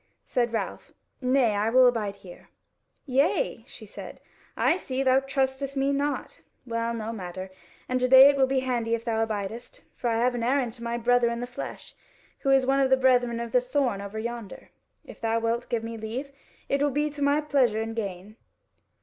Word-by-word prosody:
Said 240 -2 0
Ralph: 225 - -4 0.3
"Nay, 255 -3 +3
I 205 +2 +1
will 255 +2 +6
abide 220 -5 +1
here." 185 -3 -14 0.6
"Yea," 280 - +1
she - - -10
said, - - -10 0.4
"I 330 - +3
see: 270 -7 -3
thou 260 0 +4
trustest 270 0 -2
me 275 +1 +1
not. 285 +1 -3 0.2
Well, 230 -1 -2
no 225 0 -4
matter; 185 -2 -7 0.4
and 255 0 0
to 255 - +2
day 260 +1 +9
it 285 - +4
will 265 -1 +3
be 265 0 +1
handy 240 -3 0
if 230 - -8
thou 225 -1 +1
abidest. 225 - -5
For 245 - -4
I 225 -1 +1
have 245 +2 +2
an 240 - -3
errand 250 -1 +1
to 235 -1 -11
my 235 0 -2
brother 240 0 +3
in 235 0 -3
the 245 - -3
flesh, 245 0 -8 0.5
who 275 - -1
is 270 -1 +4
one 270 +1 +2
of 270 -1 +3
the 265 - +5
brethren 245 -2 +2
of 235 -1 -5
the 250 - +4
Thorn 250 -5 -1
over 200 +2 -7
yonder. 235 -2 -6 0.3
If - - -13
thou 225 0 +1
wilt 230 +1 -2
give 230 -2 -1
me 230 0 -5
leave, 245 +6 -5 0.4
it 275 0 0
will 290 - +3
be 295 +2 -1
to 290 0 -8
my 285 +1 +3
pleasure 270 -7 +2
and 225 0 -4
gain." 200 0 -5
245 Hz, 205 wpm, -26 LUFS, 225-270 Hz, 0.6 s, day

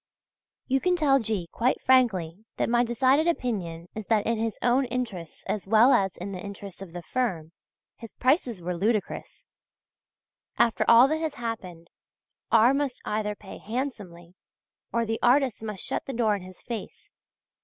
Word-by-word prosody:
You 270 0 +1
can 360 0 +2
tell 285 -5 +3
G. 215 -7 -2
quite 245 +3 +1
frankly 210 -8 +2
that - - 0
my 240 0 +4
decided 260 +6 +2
opinion 190 - -2
is 215 -2 -7
that 215 -3 +2
in 230 -1 0
his 225 -1 -2
own 250 +2 +3
interests 225 -10 -5
as 205 -2 -3
well 225 +6 +6
as 195 -1 +1
in 185 +3 -6
the 185 -1 -6
interests 200 -2 -9
of 190 -3 -8
the 175 0 -7
firm, 180 -12 -2 0.5
his 230 -2 -11
prices 255 - +1
were 180 +1 -2
ludicrous. 210 +4 -2 1.1
After 230 - +3
all 235 +3 +8
that 315 +1 0
has 315 -3 -2
happened, 195 -9 -6 0.6
R. 230 +3 +6
must 275 -3 -1
either 210 0 -2
pay 200 -1 -11
handsomely 205 -8 -5 0.6
or 235 0 0
the 225 0 -2
artists 255 -2 +3
must 210 -4 -5
shut - - -3
the 270 - -4
door 225 -3 +2
in 200 - -6
his 185 0 -13
face. 230 -4 -7
225 Hz, 165 wpm, -26 LUFS, 195-250 Hz, 1.1 s, all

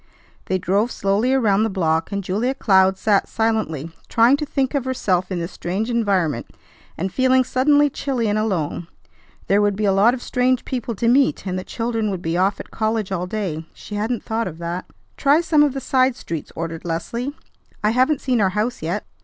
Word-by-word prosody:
They 185 - 0
drove 195 +6 +1
slowly 200 +6 +1
around 215 -7 +3
the 225 - +2
block, 165 -3 0
and 200 0 -2
Julia 220 +8 -1
Cloud 190 -5 +3
sat 205 -1 +2
silently, 215 -9 -1 0.2
trying 230 +4 +5
to 300 0 -4
think 270 -1 -1
of 280 -3 0
herself 195 -8 -1
in 185 - -1
this 170 +2 -4
strange 200 +7 -3
environment, 190 - 0 0.5
and 190 +2 -3
feeling 260 0 +4
suddenly 285 +4 +3
chilly 265 -4 -2
and 210 +1 +1
alone. 175 -6 -2 0.6
There 200 +2 +3
would 205 -1 +2
be 210 +1 -1
a 195 - +3
lot 215 +6 +4
of 245 - -9
strange 255 0 +1
people 245 -3 -3
to 230 - -1
meet, 265 0 +3
and 185 -1 -2
the - - -6
children 225 -1 -2
would 190 -3 -4
be 165 +1 -1
off 190 +3 +1
at - - -9
college 220 -2 -1
all 180 -1 -2
day. 180 -6 -4
She - - -10
hadn't 220 +3 -2
thought 225 +1 -2
of 160 -3 -7
that. 170 +2 -4 0.3
"Try 285 +2 +4
some 320 -3 +3
of 295 -3 +3
the - - -1
side 260 -1 +2
streets," 165 -8 -6
ordered 165 -1 -5
Leslie; 235 - -3 0.5
"I 210 - +3
haven't 260 +4 +2
seen 250 -4 +1
our 195 - +3
house 215 +6 -2
yet." 175 +6 -3
215 Hz, 205 wpm, -21 LUFS, 185-250 Hz, 0.6 s, trying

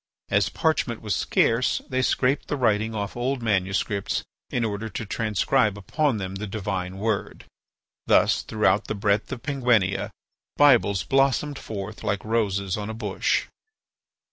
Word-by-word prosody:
As - - +2
parchment 135 -7 0
was 105 -2 -1
scarce, 115 +8 +2
they 130 0 0
scraped 130 +2 +1
the 145 - -2
writing 110 -2 +1
off 100 -1 -3
old 125 +1 -2
manuscripts 100 -1 0 0.3
in 120 -2 0
order 110 +1 -3
to 110 - -5
transcribe 110 +1 +1
upon 135 - 0
them 95 -2 -4
the 100 +2 -5
divine 95 -2 -3
word. 105 0 -2 0.6
Thus - - +4
throughout - - +1
the - - -2
breadth 100 +3 0
of 125 -4 -6
Penguinia 120 -9 +1 0.5
Bibles 115 -10 +5
blossomed 135 +1 +1
forth 105 0 -7
like 100 -2 -2
roses 100 -4 0
on 105 0 -4
a 110 - -5
bush. 105 -4 0
110 Hz, 140 wpm, -25 LUFS, 100-125 Hz, 0.6 s, Bibles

